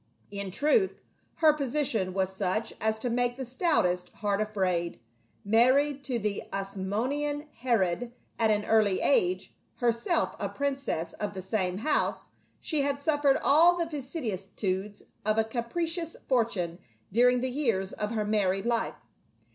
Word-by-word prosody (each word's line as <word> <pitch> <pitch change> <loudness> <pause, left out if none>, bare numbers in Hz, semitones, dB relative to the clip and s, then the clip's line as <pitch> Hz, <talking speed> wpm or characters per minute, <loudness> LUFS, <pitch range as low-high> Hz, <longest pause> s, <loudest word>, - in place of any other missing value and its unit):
In 200 -1 -4
truth, 305 - +2 0.4
her 315 -2 +5
position 255 -9 0
was 190 -1 0
such 200 +3 -1
as 220 0 +1
to 225 - -3
make 245 0 +1
the 265 - -4
stoutest 230 - +1
heart 205 -1 -1
afraid: 185 - -1 0.5
married 260 +6 +3
to 250 -2 -1
the 210 -2 -1
Asmo 195 +3 -2
nean 290 +1 -2
Herod 235 -2 0 0.3
at 225 -1 +3
an 210 -1 +2
early 215 -4 +3
age, 185 -8 +2 0.2
herself 240 +7 +1
a - - -2
princess 275 - -2
of 205 -1 -4
the 190 - -4
same 190 -2 -1
house, 295 +8 0 0.3
she 310 -3 0
had 280 0 0
suffered 285 -1 +2
all 335 +5 +6
the 340 - 0
vicissitudes 210 - -4 0.2
of 215 +1 +1
a 220 - +4
capricious 325 +9 -2
fortune 205 -9 0 0.3
during 245 +3 +4
the 260 0 -1
years 230 -9 0
of 210 - -3
her 215 -2 -1
married 195 -2 +1
life. 235 -1 0
225 Hz, 145 wpm, -28 LUFS, 195-280 Hz, 0.5 s, all